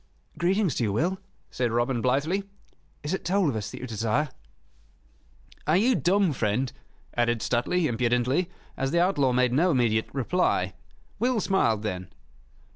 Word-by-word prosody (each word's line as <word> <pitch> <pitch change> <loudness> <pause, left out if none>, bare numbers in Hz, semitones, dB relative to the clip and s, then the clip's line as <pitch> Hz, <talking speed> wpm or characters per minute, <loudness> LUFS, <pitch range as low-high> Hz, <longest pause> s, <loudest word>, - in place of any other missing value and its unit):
"Greetings 185 -1 +1
to 120 - -1
you, 105 - +1
Will," 175 - 0 0.3
said 120 -2 -1
Robin, 120 +1 0
blithely. 155 - 0 0.5
"Is 150 +4 -2
it 190 - -2
toll 185 -2 +2
of 130 - -2
us 105 -1 -3
that - - -8
you - - -4
desire?" 115 +5 0 1.4
"Are - - +4
you 240 +6 +4
dumb, 190 -4 +2
friend?" 120 +2 -1 0.4
added 120 -1 +1
Stuteley, 140 +9 +1
impudently, 125 +6 +1 0.3
as 135 - -1
the 170 - +2
outlaw 165 -8 +3
made 125 0 +2
no 165 +7 +3
immediate 115 -7 +2
reply. 160 +7 0 0.5
Will 245 -1 +2
smiled 115 - +1
then. 95 -4 -4
135 Hz, 150 wpm, -26 LUFS, 120-180 Hz, 1.4 s, Are